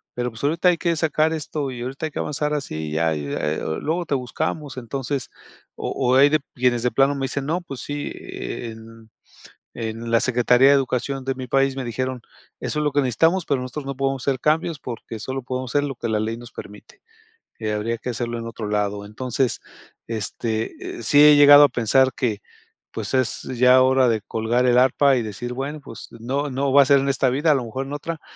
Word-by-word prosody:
pero, 125 0 -2
pues, 110 - -11
ahorita 160 +5 +1
hay 175 - +2
que 170 0 0
sacar 155 0 +1
esto, 150 -3 -3
y 120 -2 -7
ahorita 135 +5 -4
hay - - -10
que - - -5
avanzar 150 0 -2
así, 145 - -3
y - - -8
ya 80 0 +1
y 75 -1 -4
eh, 75 +2 -2
oh, 80 - -2
luego 170 +3 -2
te 145 - -1
buscamos", 140 +3 -3
entonces, 130 +2 -4 0.5
o - - -4
o 130 -1 +1
hay 140 +2 +7
de 155 +1 +2 0.2
quienes 120 -2 +1
de 125 - +1
plano 135 +1 +3
me 135 -1 -2
dicen: 135 +1 -3
"No, 165 +4 0
pues 135 -8 -8
sí", 145 0 -4
eh, 115 - -6
en 110 0 -14 0.7
en 115 +1 -5
la 115 - +5
secretaría 125 +1 +4
de 140 - +6
Educación 135 0 -1
de 135 - 0
mi 130 -1 -7
país 135 +1 +2
me 135 - -4
dijeron: 125 +1 -3 0.4
"Eso - - -3
es - - 0
lo 150 - +1
que 145 - +3
necesitamos, 165 - +2
pero, 140 -3 0
nosotros 130 +3 -6
no 140 0 -4
podemos 135 0 -1
hacer 135 -2 +1
cambios, 155 +3 +1
porque 115 -3 -7
solo 130 +5 -4
podemos 130 0 -4
hacer 145 - +3
lo 140 -2 -4
que 120 - -4
la 110 -1 +1
ley 110 +1 -3
nos 120 0 -11
permite. 105 - -12 0.6
Eh, 110 -1 -2
habría 110 +2 -2
que 125 - -5
hacerlo 120 0 -3
en 115 - -6
otro 115 -2 -6
lado". 105 -1 -1
Entonces, 125 +4 -2 0.5
este, 110 0 -4
eh, - - -7
sí 145 +5 +5
he 150 0 +8
llegado 145 0 +9
a - - +5
pensar 130 +3 +3
que, 110 -6 -2 0.5
pues, - - -4
es 130 -2 0
ya 125 +1 +4
hora 130 0 +4
de 110 -2 +1
colgar 115 +4 0
el 125 -1 +4
arpa, 130 +2 +4
y 120 - 0
decir: 110 +3 -5
"Bueno, 140 +4 -4
pues, 115 -5 -10
no, 135 +6 -3
no 135 +1 -1
va 140 +1 +8
a - - +2
ser 140 0 +6
en 135 - -1
esta 130 -1 +2
vida, 150 +5 +2
a - - +4
lo 130 -3 -1
mejor 130 +4 -5
en 140 - -5
otra, 160 +2 -5
130 Hz, 230 wpm, -22 LUFS, 115-140 Hz, 0.7 s, llegado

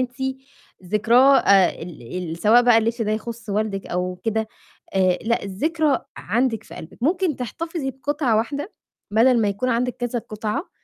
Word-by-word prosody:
أنتِ 260 +1 -3 0.5
ذكراه 235 +8 +5
آآ، 195 -3 +5
ال 170 +1 -7
ال - - -5
سواء 225 +6 +5
بقى 240 -2 +5
الِلبس 230 +1 0
ده 215 -1 0
يخُصّ 225 0 -5
والدِك 200 -1 -2
أو 180 +1 -2
كده 220 -1 -1 0.5
آآ، 185 -2 +3
لأ 235 +1 0
الذكرى 295 - 0 0.2
عندِك 230 +2 0
في - - -12
قلبِك، 160 - -11
ممكن 340 +1 +1
تحتفظي 320 +3 -4
بقطعة 265 -2 -1
واحدة 280 - -2 0.4
بَدَل 235 +3 +4
ما 210 - +2
يكون 200 +6 -2
عندِك 250 +1 0
كذا 245 0 -2
قطعة، 215 - -4
230 Hz, 160 wpm, -22 LUFS, 210-265 Hz, 0.5 s, ذكراه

